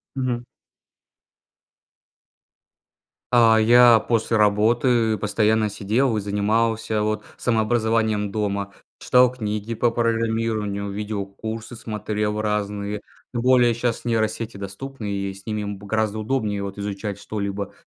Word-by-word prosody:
Мгм. 125 -2 -2 2.9
А, 115 -2 +6
я 120 0 +7
после 110 0 0
работы 110 +2 +3
постоянно 105 +1 +1
сидел, 110 +5 0
и 105 - 0
занимался 110 +2 0
вот 110 0 -1
самообразованием 110 -2 +1
дома. 100 -2 -2 0.3
Читал 125 0 +5
книги 105 -1 -3
по 120 +1 +1
программированию, 115 -3 -1
видеокурсы 105 +3 -5
смотрел 105 -1 -3
разные. 105 -1 -2 0.3
Тем 120 - -1
более 125 -1 +4
щас 120 0 -2
нейросети 110 -1 -1
доступны, 105 +5 -7
и 100 -1 -3
с 95 0 -15
ними 105 -1 -3
б 100 0 -6
гораздо 110 0 -1
удобнее 105 -3 -1
вот 100 0 -6
изучать 100 0 -4
что-либо. 100 -2 -4
110 Hz, 110 wpm, -23 LUFS, 105-115 Hz, 2.9 s, я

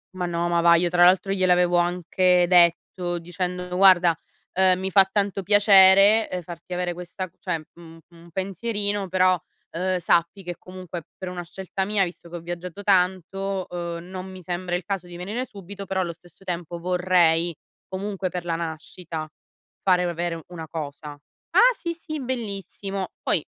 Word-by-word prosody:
Ma 180 - -2
no, 170 0 -1
ma 170 0 +2
va, 170 0 +6
io 175 +1 +2
tra 175 0 +4
l'altro 190 +2 +4
gliel'avevo 180 -2 +3
anche 180 +1 +2
detto 175 0 +3
dicendo: 180 +1 -4
"Guarda, 180 -4 +6 0.4
ehm, 185 0 +3
mi 190 0 -2
fa 195 0 +6
tanto 200 -1 0
piacere, 200 +1 +6
ehm, 180 -1 -3
farti 175 +1 -9
avere 180 0 -1
questa 180 +1 -6
cioè 165 -4 -3
un 165 -1 -13
un 170 0 -17
pensierino, 200 +1 -2
però, 185 -1 +3 0.3
ehm, 185 +2 -1
sappi 170 +3 +1
che 175 0 -5
comunque 180 -2 -8
per 185 -1 -6
una 180 -1 -5
scelta 190 +2 -4
mia, 205 0 +2
visto 175 0 -10
che 175 +1 -7
ho - - -7
viaggiato 175 +3 -7
tanto, 190 0 0
uhm, 170 -1 -5
non 185 0 -6
mi 185 - -10
sembra 180 0 -4
il 175 0 -1
caso 195 -1 -3
di 175 -1 -11
venire 210 +9 -4
subito, 200 -1 -10
però 190 0 -2
allo 170 -2 -3
stesso 175 +2 -21
tempo 175 -2 -5
vorrei 175 -2 +2 0.3
comunque 190 0 -3
per 180 -1 -5
la 165 -1 -1
nascita 160 0 -6 0.5
fare 180 -2 +3
avere 170 -1 -3
una 165 -3 -8
cosa." 150 -1 -6 0.4
"Ah, - - +6
sì, 340 -1 -3
sì, 315 -2 -6
bellissimo." 200 -6 -4
Poi - - 0
180 Hz, 170 wpm, -24 LUFS, 175-190 Hz, 0.5 s, va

